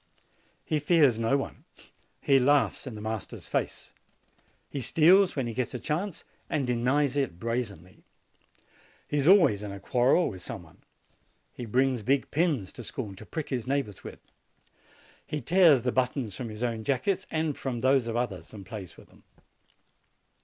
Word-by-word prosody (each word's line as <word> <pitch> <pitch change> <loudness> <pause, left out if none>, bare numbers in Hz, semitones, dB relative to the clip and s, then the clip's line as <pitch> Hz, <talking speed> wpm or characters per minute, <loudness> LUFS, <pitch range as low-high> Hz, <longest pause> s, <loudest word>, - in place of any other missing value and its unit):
He 155 - 0
fears 145 -6 +4
no 115 +5 +2
one. 135 - -6 0.6
He 135 -1 +4
laughs 140 +1 +2
in 125 - -6
the 105 - -8
master's 110 -1 -5
face. - - -3 0.7
He 140 - -5
steals 180 - +5
when 135 -4 -1
he 115 - -4
gets 125 +2 -3
a - - -3
chance 165 - -3 0.3
and 140 - 0
denies 125 +3 +1
it 135 -12 -1
brazenly. 105 -6 -4 1.1
He 145 - -1
is 140 +1 +1
always 170 - +6
in 105 -1 -5
a 100 - -7
quarrel 125 - +3
with 95 -3 -10
some - - -7
one. - - -20 0.7
He 120 - -7
brings 130 +1 +1
big 130 +5 0
pins 150 - 0
to 120 - -8
school, 110 -3 -6
to 110 - -12
prick 160 -3 -5
his 125 -3 -3
neighbors 135 -7 -2
with. - - -8 1.1
He 150 - -3
tears 165 -3 +5
the 125 - +1
buttons 125 -4 -1
from 120 -3 -5
his 110 +2 -6
own 115 -2 -2
jackets 175 - 0
and 155 -2 -1
from 125 -4 -4
those 130 -1 +3
of 115 - -3
others, 120 -6 -3
and 100 -3 -9
plays 95 -3 -8
with - - -15
them. - - -21
125 Hz, 170 wpm, -28 LUFS, 110-145 Hz, 1.1 s, always